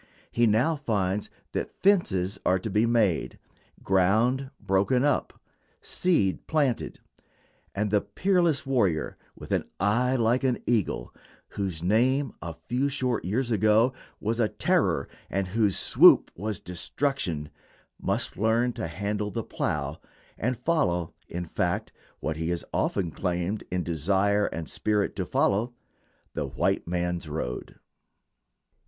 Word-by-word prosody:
He 120 0 +3
now 125 +10 +2
finds 105 -7 -1 0.2
that - - -2
fences 100 - +1
are 95 - +3
to 105 +3 -5
be 105 +4 +3
made, 110 -7 +1 0.5
ground 110 +8 +2
broken 100 +6 +2
up, 145 -1 0 0.4
seed 160 - 0
planted; 145 -6 0 0.8
and 105 0 -1
the 105 -1 +3
peerless 175 -7 +1
warrior, 100 - +1 0.2
with - - -11
"an - - +1
eye 120 +6 +2
like 120 +2 +2
an 130 -2 +2
eagle," 105 - 0 0.4
whose 95 -5 -4
name 125 +9 +2
a 85 -2 -6
few 125 +10 -1
short 130 -6 -1
years 120 +6 -1
ago 110 +4 +4 0.3
was 115 +3 -1
a 110 -3 +3
terror - - +1 0.2
and 95 -1 -1
whose 105 -1 +2
swoop - - +6
was 105 +2 -3
destruction, 90 - -2 0.5
must - - -1
learn 115 +4 +2
to - - -4
handle 105 +4 -2
the - - -3
plow, - - -3 0.3
and 125 +2 -1
follow, 110 - 0
in 90 +1 -4
fact, 80 - -1 0.3
what 80 0 -3
he 80 +1 -2
has 85 -1 -2
often 90 -4 0
claimed 90 +5 -2
in 90 -1 -1
desire 100 +6 +1
and 80 -1 -5
spirit 105 -2 0
to - - -3
follow, 115 +5 +1 0.6
"the - - -2
white - - 0
man's 90 -2 -2
road." 70 -5 -4
105 Hz, 135 wpm, -27 LUFS, 90-125 Hz, 0.8 s, swoop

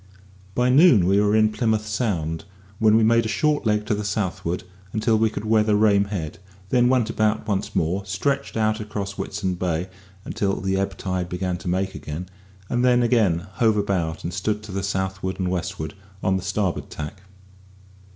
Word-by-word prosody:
By 125 0 +2
noon 130 - +6
we 100 +2 +4
were 105 0 +3
in 110 0 +4
Plymouth 110 0 0
Sound, 100 -6 -2 0.3
when 110 0 +5
we 115 - +4
made 115 +1 +4
a 110 - -3
short 150 -1 +1
leg 105 0 +1
to 110 - 0
the 105 0 -2
southward 95 -4 -2 0.3
until 110 +1 +2
we 110 0 +3
could 105 0 -6
weather 110 -1 +3
Rame 105 -1 +4
Head; 90 -7 -5 0.3
then 125 +1 +4
went 125 -4 +2
about 110 0 0
once 105 0 -2
more, 90 +5 0
stretched 125 +9 -2
across 105 -2 -1
Whitesand 95 -2 -3
Bay 90 0 -1 0.4
until 100 -1 -1
the 95 0 -1
ebb 95 0 -1
tide 90 -2 -2
began 90 0 -2
to 85 - -9
make 95 +2 0
again, 80 +5 -6 0.4
and 120 +3 0
then 125 -1 +4
again 110 -9 +3 0.2
hove 110 -3 +3
about 90 -6 -1
and 85 - -4
stood 105 +4 -2
to 105 - -9
the 95 +1 -2
southward 95 0 -2
and 90 -1 0
westward, 85 -3 -3 0.3
on 95 - +2
the 95 - -1
starboard 95 -1 -2
tack. 75 +5 -7
100 Hz, 180 wpm, -23 LUFS, 95-110 Hz, 0.4 s, noon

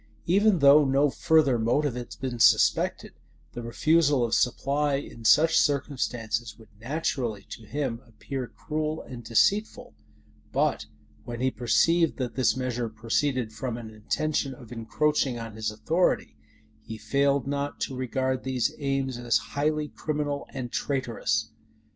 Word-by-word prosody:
Even 200 +3 +4
though 145 0 +7
no 140 +1 +2
further 150 -7 +3
motive 125 +5 +1
had 120 0 -7
been 125 -2 -4
suspected, - - +3 0.4
the 120 - -6
refusal 145 +2 +2
of 115 - -3
supply 140 +3 +1
in 125 -4 -7
such 160 +8 +5
circumstances 120 -6 -1
would 110 -2 -17
naturally 120 -5 -2
to 110 -3 -9
him 125 -2 -3
appear 125 +3 -6
cruel 155 +5 -4
and 120 -2 -9
deceitful: 200 - +1 0.6
but - - 0 0.4
when 120 -1 -6
he 130 +1 +1
perceived 165 +8 +2
that 125 -3 -3
this 130 +2 +1
measure 125 -2 -2
proceeded 115 +2 -1
from 120 0 -4
an 115 -2 -8
intention 135 +5 -2
of 120 -4 -14
encroaching 125 +3 0
on 115 -1 -7
his 110 0 -2
authority, 155 +12 0 0.5
he 110 0 -8
failed 140 +2 +1
not 140 +1 -3
to 135 - -2
regard 130 +1 -2
these 130 -2 0
aims 135 -3 -1
as 120 -3 +2 0.2
highly 150 +1 0
criminal 145 -1 -3
and 125 -2 -6
traitorous. 115 -5 -1
130 Hz, 140 wpm, -27 LUFS, 115-145 Hz, 0.6 s, though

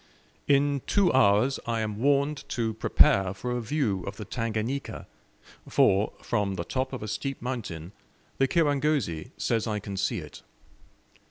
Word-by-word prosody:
In 140 -1 +3
two 200 -4 +3
hours 125 +1 +4
I 115 -1 0
am 105 -1 -3
warned 140 +2 +1
to 115 -2 -1
prepare 95 -3 +3
for 125 +5 -4
a 120 0 -1
view 115 -6 0
of 100 - -5
the 105 - -6
Tanganika, 115 +5 -3 0.6
for, 100 +2 +3
from 100 -2 0
the 85 - -3
top 130 +8 -2
of 130 -5 -5
a - - -4
steep 135 +6 -3
mountain 100 -10 -5 0.5
the 135 - +4
kirangozi 145 - +1
says 115 0 0
I 105 -1 -1
can 100 -1 -6
see 100 - 0
it. - - -9
115 Hz, 155 wpm, -27 LUFS, 100-140 Hz, 0.6 s, hours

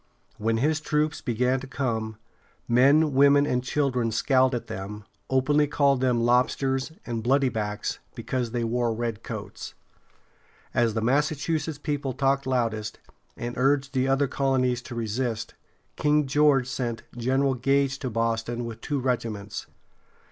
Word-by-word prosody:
When 115 +1 +1
his 155 +6 +1
troops 150 0 0
began 125 +2 +1
to 135 - -9
come, 110 -5 -2 0.5
men, 140 +5 +4
women, 140 +1 +5
and 125 -3 0
children 130 -3 0
scowled 130 +3 +3
at 120 - -4
them, 100 +2 -6 0.3
openly 145 +3 +3
calling 140 -2 +2
them 125 -2 +2
"lobsters" 130 +3 +1
and 115 -2 -3
"bloody 135 +3 +3
backs" 105 -2 -3 0.2
because 125 -2 -2
they 120 0 -2
wore 115 0 0
red 115 -2 -3
coats. - - -7 1.0
As 115 -2 +2
the 110 - 0
Massachusetts 150 +4 0
people 145 -3 -2
talked 135 0 +1
loudest, 115 -4 -1 0.4
and 120 0 -4
urged 140 +1 +2
the 130 0 +1
other 135 +1 +2
colonies 130 -2 +1
to 120 - -9
resist, 115 0 -2 0.4
King 150 0 +3
George 140 -2 +3
sent 120 -4 -3
General 130 +3 +1
Gage 135 +2 +1
to 130 - -3
Boston 115 +1 -1
with 115 -1 -7
two 145 -2 -2
regiments. 115 -5 -3
130 Hz, 140 wpm, -26 LUFS, 115-140 Hz, 1.0 s, women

